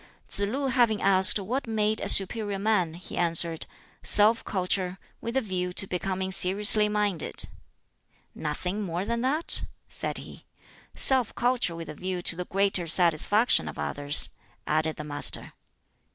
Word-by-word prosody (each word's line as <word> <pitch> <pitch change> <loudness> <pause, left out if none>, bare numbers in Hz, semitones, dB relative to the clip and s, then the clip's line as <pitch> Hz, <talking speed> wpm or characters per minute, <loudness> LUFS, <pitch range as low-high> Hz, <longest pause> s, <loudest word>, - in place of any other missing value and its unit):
Tsz - - -5
lu 275 +6 -4
having 240 -5 +1
asked 190 0 +6
what 230 +7 -5
made 215 -1 -1
a - - -2
"superior 205 +1 +3
man," 195 -5 -1
he 175 - -10
answered, 170 -1 0 0.3
"Self 215 +2 +6
culture, 185 -1 -3 0.2
with 230 +3 -4
a - - +1
view 185 -5 -4
to 190 - +3
becoming 190 +1 -4
seriously 205 +3 +4
minded." 205 -5 -2 0.9
"Nothing 180 +7 -5
more 180 -1 -4
than 235 +2 -3
that?" 290 +6 -1 0.2
said - - -6
he. - - -12 0.5
"Self 260 -4 +5
culture 245 -8 -1
with 165 -1 -9
a - - -8
view 180 +2 -5
to 170 - -1
the 180 +1 -6
greater 195 -2 -1
satisfaction 180 +7 +2
of - - -9
others," 145 0 -2 0.4
added 155 +1 -2
the 150 - -8
Master. 145 -1 -3
195 Hz, 150 wpm, -25 LUFS, 175-215 Hz, 0.9 s, asked